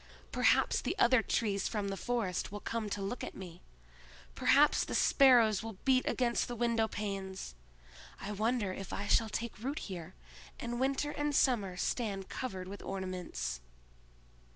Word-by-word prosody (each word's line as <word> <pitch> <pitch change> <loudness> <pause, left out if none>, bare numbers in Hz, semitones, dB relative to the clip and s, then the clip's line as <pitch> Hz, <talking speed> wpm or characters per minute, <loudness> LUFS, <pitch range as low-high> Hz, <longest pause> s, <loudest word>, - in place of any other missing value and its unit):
Perhaps - - +3
the 380 - -2
other 255 - +5
trees 200 -4 0
from 205 -3 -2
the 195 - -2
forest 205 -6 -2
will 205 - -5
come 225 0 -3
to 200 0 -3
look 220 +6 -4
at - - -6
me! 180 -2 -9 0.7
Perhaps - - +4
the - - -4
sparrows 235 -7 +5
will 220 -3 -7
beat 260 -1 +4
against 240 -2 +1
the 245 - -4
windowpanes! 210 - -2 0.7
I 200 - -5
wonder 215 -1 0
if 195 -1 -7
I 200 - -3
shall 225 +2 +3
take 230 +1 -4
root 275 +6 -3
here, 185 - -6 0.4
and 240 0 -3
winter 275 +3 0
and 295 -1 -1
summer 205 -10 +2
stand 200 -3 -2
covered 190 -8 -5
with 200 +1 -8
ornaments!" 180 - -4
215 Hz, 155 wpm, -33 LUFS, 195-240 Hz, 0.7 s, other